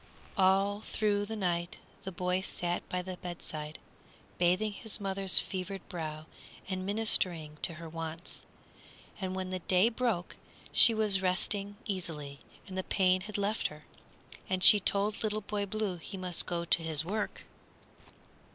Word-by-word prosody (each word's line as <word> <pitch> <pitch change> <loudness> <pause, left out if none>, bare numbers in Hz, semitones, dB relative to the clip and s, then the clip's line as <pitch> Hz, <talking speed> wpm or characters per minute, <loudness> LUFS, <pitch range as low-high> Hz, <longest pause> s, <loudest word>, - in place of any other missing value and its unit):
All 195 +2 +3
through 205 -2 0
the 220 - -4
night 175 -3 -1 0.3
the 190 - -3
boy 180 +1 0
sat 175 -2 -2
by 180 0 -1
the 185 0 -6
bedside, 160 -4 -6 0.6
bathing 180 +5 +3
his 220 +1 -4
mother's 195 -1 +1
fevered 190 0 +1
brow 155 -4 -5 0.4
and 185 -1 -2
ministering 180 -7 +1
to 165 - +3
her 165 +1 -8
wants. 165 +1 -6 0.8
And 185 -2 -3
when 185 -1 -3
the 185 - -2
day 185 +5 +4
broke 225 -7 -1 0.3
she 230 - +7
was 210 -3 +3
resting 200 +2 0
easily 155 -8 -4 0.3
and 190 - -8
the 190 - -1
pain 185 -1 +3
had 210 +2 -5
left 205 +2 0
her, 150 0 -12 0.6
and 185 -1 0
she 210 - +10
told 200 +2 +1
Little 215 -1 0
Boy 205 0 -2
Blue 210 -3 -2
he 180 +3 -8
must 180 -2 -2
go 170 -1 -1
to 170 - +4
his 160 -1 -1
work. 210 +4 -3
185 Hz, 150 wpm, -31 LUFS, 175-205 Hz, 0.8 s, she